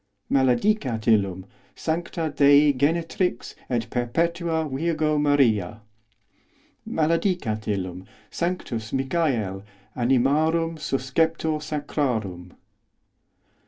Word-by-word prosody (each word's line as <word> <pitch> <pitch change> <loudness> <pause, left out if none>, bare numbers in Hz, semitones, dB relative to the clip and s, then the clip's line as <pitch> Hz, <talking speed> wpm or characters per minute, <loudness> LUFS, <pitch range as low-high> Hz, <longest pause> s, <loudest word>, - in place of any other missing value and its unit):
os 100 0 -26
Maledicat 130 - +1
illum 100 -4 +2 0.3
sancta 165 -1 -3
Dei 145 +1 +6
genetrix 165 +1 -1 0.2
et 120 -3 0
os - - -13
perpetua 160 +7 -1
Virgo 155 +1 0
Maria. 115 -8 +2 1.1
Maledicat 160 - 0
illum 95 -2 -3 0.2
sanctus 130 -11 -3
Michael, 130 - -1 0.3
animarum 150 +7 +2
susceptor 155 +3 0
sa 150 0 -4
os 145 - -4
crarum. 105 - -2
140 Hz, 90 wpm, -24 LUFS, 110-160 Hz, 1.1 s, Dei